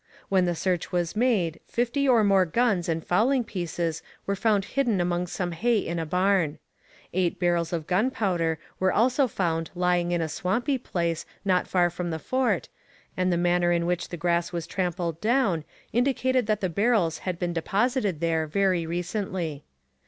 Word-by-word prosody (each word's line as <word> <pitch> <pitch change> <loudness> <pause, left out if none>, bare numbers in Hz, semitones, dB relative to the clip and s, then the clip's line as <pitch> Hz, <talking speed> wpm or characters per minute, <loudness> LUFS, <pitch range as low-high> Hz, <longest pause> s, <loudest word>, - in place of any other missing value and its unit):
When 190 -2 +3
the 175 -1 0
search 180 0 -1
was 175 0 -1
made 210 -9 +1
fifty 245 +4 0
or 235 -4 +5
more 195 -2 +5
guns 185 -1 +1
and 165 -1 -1
fowling 240 +8 +2
pieces 170 -5 -3 0.2
were 200 - 0
found 205 -1 +2
hidden 245 -8 +1
among 175 0 0
some 175 0 -3
hay 230 +7 +1
in 170 -4 -2
a 165 - -3
barn. 180 -3 +2 0.6
Eight 180 -1 0
barrels 175 -2 +1
of 165 -3 -2
gunpowder 180 -5 +1 0.2
were 185 0 +3
also 255 +4 +3
found 165 -6 -1
lying 175 -1 +1
in 175 - +1
a 165 - -1
swampy 235 - -1
place 170 -7 -2 0.2
not 185 -2 +2
far 175 -2 +2
from 175 0 -4
the 160 - -2
fort, 245 +2 0 0.5
and 185 0 +1
the 175 - +2
manner 175 0 +2
in 170 -1 +1
which 175 0 -1
the 175 - -5
grass 170 0 0
was 170 -2 -3
trampled 175 -2 -2
down 215 - +1 0.3
indicated 255 0 +1
that 215 -1 0
the 190 - +1
barrels 200 -3 +1
had 185 -2 -3
been 175 -1 -2
deposited 200 - 0
there 165 -1 +1
very 180 0 +1
recently. 175 -3 -3
180 Hz, 175 wpm, -26 LUFS, 170-210 Hz, 0.6 s, or